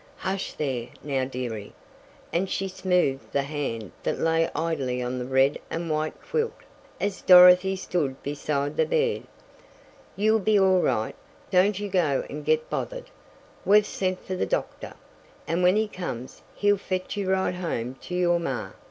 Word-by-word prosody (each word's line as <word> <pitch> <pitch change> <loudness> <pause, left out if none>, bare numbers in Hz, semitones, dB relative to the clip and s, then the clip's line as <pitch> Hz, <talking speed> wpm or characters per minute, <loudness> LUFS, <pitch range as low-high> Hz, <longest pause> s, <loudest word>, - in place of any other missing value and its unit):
"Hush 190 0 -3
there, 130 -5 -3 0.2
now, 135 -3 -1
dearie," 120 -5 -5 0.6
and 185 +3 0
she 195 - -1
smoothed 180 -7 0
the 140 - +1
hand 135 - -4
that - - -1
lay 165 0 +2
idly 140 -7 -1
on 125 +1 -3
the 125 - -3
red 135 +2 +3
and 165 -1 -3
white 155 0 -2
quilt, 460 0 -1 0.4
as 200 -2 -2
Dorothy 180 +1 +8
stood 150 -8 -2
beside 145 0 -2
the 480 - +3
bed. 475 -1 0 0.9
"You'll 215 +2 +3
be 215 +1 +3
all 190 -1 +4
right. 110 -7 0 0.4
Don't 190 +2 +4
you 205 - -3
go 175 -8 +1
and - - -6
get 470 +1 +1
bothered. - - -5 0.5
We've 210 +1 +5
sent 185 -2 -3
fer 185 - -3
the - - -1
doctor, - - -3 0.5
and 170 +2 0
when 180 +2 +5
he 215 0 +2
comes, 130 - -6
he'll 205 0 +3
fetch 185 0 -3
you 200 -2 -2
right 190 -1 +1
home 145 -9 -3
to 180 - -4
your 175 -1 +2
maw. 135 -7 -3
180 Hz, 160 wpm, -26 LUFS, 140-195 Hz, 0.9 s, Dorothy